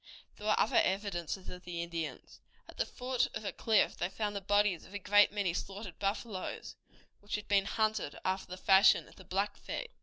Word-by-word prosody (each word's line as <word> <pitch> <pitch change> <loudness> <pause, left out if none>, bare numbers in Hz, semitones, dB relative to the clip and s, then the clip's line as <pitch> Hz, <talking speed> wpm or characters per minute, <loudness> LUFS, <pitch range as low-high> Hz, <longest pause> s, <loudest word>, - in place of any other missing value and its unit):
There 210 - -6
were 215 - +3
other - - +3
evidences 190 -2 -2
of 180 0 -8
the 170 -1 -4
Indians. 170 -2 -6 0.3
At - - -13
the - - 0
foot 250 0 0
of 220 -1 -5
a - - -1
cliff 220 -2 +2
they 175 - -2
found 205 +1 -3
the 200 - -3
bodies 205 -3 +2
of 200 - -12
a - - 0
great 205 +1 +5
many 200 -4 0
slaughtered 195 0 -6
buffaloes, 200 -1 -3 0.4
which 205 - -4
had 210 0 -5
been 200 -1 +3
hunted 215 -7 0
after 190 0 -1
the 185 - -6
fashion 190 +1 +5
of - - -18
the 190 - -13
Blackfeet. 205 - -3
200 Hz, 200 wpm, -33 LUFS, 185-210 Hz, 0.4 s, great